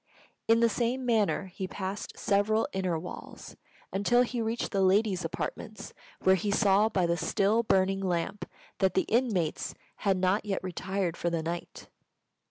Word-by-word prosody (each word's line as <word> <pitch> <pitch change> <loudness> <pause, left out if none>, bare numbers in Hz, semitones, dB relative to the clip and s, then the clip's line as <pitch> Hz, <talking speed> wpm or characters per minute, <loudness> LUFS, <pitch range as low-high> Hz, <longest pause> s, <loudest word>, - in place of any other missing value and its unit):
In 230 +1 +5
the 235 - +6
same 240 +3 -1
manner 220 -4 +2
he 190 0 -6
passed 195 +2 -5
several 215 +2 +2
inner 185 -3 0
walls, 180 +3 -9 0.4
until 240 +5 +3
he 245 -1 -3
reached 225 +1 -2
the 195 - +1
ladies' 190 0 +3
apartments, - - -5 0.3
where 190 - +5
he 190 +2 0
saw 200 +1 +4
by 185 -5 +1
the 170 0 +1
still 205 +6 +2
burning 195 -3 +2
lamp 185 +2 -2 0.3
that 190 -1 +2
the 190 - +3
inmates 215 -9 0 0.2
had 195 -2 +1
not 185 +3 +2
yet 200 -3 -2
retired 185 -1 -2
for 175 - 0
the 165 -1 -2
night. 170 +1 -5
195 Hz, 160 wpm, -29 LUFS, 185-220 Hz, 0.4 s, the